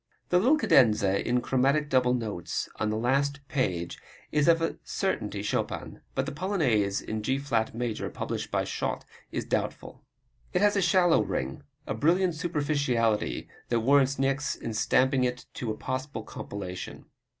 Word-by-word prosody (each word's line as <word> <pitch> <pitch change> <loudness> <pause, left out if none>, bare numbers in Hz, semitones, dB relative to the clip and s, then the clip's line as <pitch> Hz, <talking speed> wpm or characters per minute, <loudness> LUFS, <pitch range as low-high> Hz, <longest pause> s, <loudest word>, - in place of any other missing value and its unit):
The 180 - +4
little 265 +11 +4
cadenza 105 - +4
in 125 +1 +1
chromatic 135 +4 +2
double 125 -2 +3
notes 105 -8 -3
on 110 - 0
the 110 - -1
last 140 +4 0
page 90 -11 -1 0.3
is 150 0 +2
of 165 -1 +6
a 165 - -2
certainty - - -2
Chopin. - - -3
But - - 0
the - - -4
Polonaise 140 - +1
in 110 0 -4
G 130 +5 0
flat 115 -6 -1
major, 120 -2 -2
published - - -4
by - - 0
Schott, - - -3 0.3
is - - -3
doubtful. - - -3 0.5
It 180 - +2
has 205 0 +4
a 200 - +2
shallow 175 -1 +4
ring, 65 +1 -3 0.2
a - - -2
brilliant 175 - +2
superficiality 145 -9 0 0.2
that 120 -1 +2
warrants 135 +2 +4
Niecks 135 +1 0
in 115 - -5
stamping 130 +4 +3
it 125 0 -2
as 120 - -3
a - - 0
possible 130 -1 -4
compilation. 95 -4 -7
130 Hz, 160 wpm, -28 LUFS, 110-150 Hz, 0.5 s, of